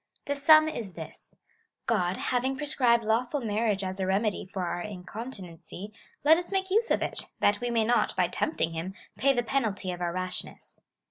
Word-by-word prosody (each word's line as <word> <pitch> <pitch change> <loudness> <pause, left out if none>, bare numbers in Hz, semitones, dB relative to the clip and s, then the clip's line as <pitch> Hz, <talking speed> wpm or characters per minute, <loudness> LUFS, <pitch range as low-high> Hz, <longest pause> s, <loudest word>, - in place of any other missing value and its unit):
' - - -37
The 285 - -1
sum 310 +2 +7
is 225 - -4
this - - -9 0.3
— - - -39 0.2
God 185 -5 +1
having 260 +2 0
prescribed 250 -5 +2
lawful 240 +6 +1
marriage 215 -3 0
as 190 +1 -3
a 190 - 0
remedy 195 +1 0
for 190 -1 -3
our 175 0 -2
incontinency, 190 -1 -8 0.3
let 320 +3 +7
us 350 - -7
make 380 -1 -1
use 450 +4 +3
of - - +2
it, - - -3
that 205 +2 +3
we 245 - -1
may 230 -2 +2
not, 240 +2 +2
by - - +3
temj)ting 310 - -1
him, 170 +4 -4 0.2
pay 275 - +5
the 245 -3 +1
penalty 220 -7 -1
of 180 0 -6
our 175 -1 0
rashness. 185 +1 -6
220 Hz, 195 wpm, -28 LUFS, 185-265 Hz, 0.3 s, sum